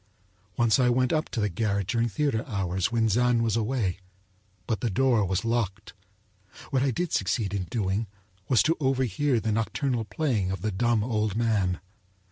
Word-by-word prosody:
Once 115 +1 +3
I 125 -1 +4
went 125 +1 +2
up 155 0 0
to - - -3
the 105 - +2
garret 100 +1 -1
during 115 +4 0
theater 125 -1 0
hours, 95 -3 -1
when 115 -1 +2
Zann 120 +2 +2
was 115 -2 +1
away, 110 -5 -1 0.7
but 110 - -1
the 120 - 0
door 120 +1 +2
was 95 +2 -1
locked. 110 -3 -2 0.8
What 135 -2 +2
I 135 - +2
did 170 +7 -2
succeed 100 +1 0
in 95 -2 -2
doing 100 +3 -1 0.4
was 125 - +5
to 165 - +2
overhear 130 -1 +1
the 110 0 -1
nocturnal 115 +2 -1
playing 110 -8 -1
of 95 -1 -4
the 110 - 0
dumb 115 +2 +1
old 110 -3 -1
man. 105 -6 +1
115 Hz, 175 wpm, -27 LUFS, 100-125 Hz, 0.8 s, was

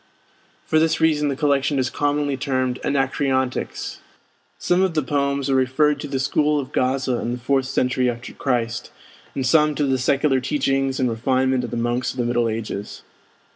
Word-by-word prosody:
For 155 - +2
this 160 0 +2
reason 150 -2 +2
the 140 - -1
collection 140 0 +1
is 130 -2 0
commonly 145 -1 0
termed 130 -2 -1
'Anacreontics'. 135 -2 -1 0.6
Some 180 +1 +1
of 190 -3 +1
the 155 - +1
poems 140 +1 0
are 135 - +1
referred 135 +3 +2
to 145 - -5
the 135 -1 -2
school 150 +2 +1
of 135 0 -6
Gaza 130 -1 0
and 120 +1 -2
the - - -9
fourth 135 +1 0
century 125 -1 +1
after 120 0 -6
Christ, 120 -3 -2 0.5
and 135 - -1
some 150 +2 +3
to 145 - +1
the 135 -1 +1
secular 135 +1 +2
teachings 135 0 0
and 130 - +2
refinement 130 +2 +1
of 120 - -4
the 120 - -4
monks 120 +1 -1
of - - -14
the 120 - 0
Middle 120 -1 +1
Ages. 110 -2 -5
135 Hz, 180 wpm, -22 LUFS, 125-145 Hz, 0.6 s, some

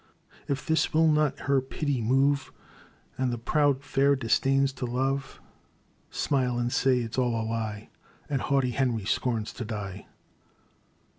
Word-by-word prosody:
" - - -27
If 135 -2 -2
this 160 -1 +1
will 160 +1 +5
not 150 -2 +2
her 140 -2 +2
pity 135 0 -2
move. 135 +4 +2 0.7
And 130 -1 +1
the 120 - -2
proud 140 +3 +1
fair 140 0 +3
disdains 135 +2 +2
to 125 - -4
love, 135 +2 -2 0.7
Smile 125 -4 0
and 120 0 -1
say 130 -2 +2
't - - -3
is - - -6
all 120 -2 +1
a 110 - -2
lie, 110 -2 -4 0.4
And 140 -4 -1
haughty 135 -3 +1
Henry 120 -5 0
scorns 115 0 -1
to 120 - -5
die 105 -3 -6
130 Hz, 155 wpm, -27 LUFS, 120-140 Hz, 0.7 s, will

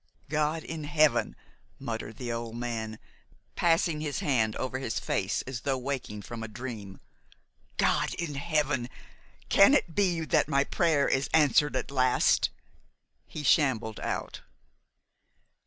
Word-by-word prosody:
"God 155 +1 0
in 160 -2 -6
heaven!" 145 -7 +2 0.4
muttered 115 -1 -5
the 120 -2 -4
old 115 -1 -4
man, 115 -2 -4 0.6
passing 165 -2 +2
a 155 -2 -2
hand 115 -6 +1
over 130 0 -3
his 120 -4 -2
face - - -1
as 125 -3 -6
though 135 0 0
waking 125 -6 -4
from 115 +2 -7
a 115 - -4
dream, 110 -4 -7 0.8
"God - - +1
in 170 -4 -4
heaven! 145 -4 0 0.6
can 200 +9 +7
it 170 - 0
be 180 -3 +1
that 155 - +2
my 140 -2 +2
prayer 155 -3 +2
is 135 +1 0
answered 145 -2 +4
at 130 - -2
last?" 130 -2 +3 0.8
He 150 - -7
shambled 120 -8 +2
out. - - -4
135 Hz, 135 wpm, -28 LUFS, 115-150 Hz, 0.8 s, can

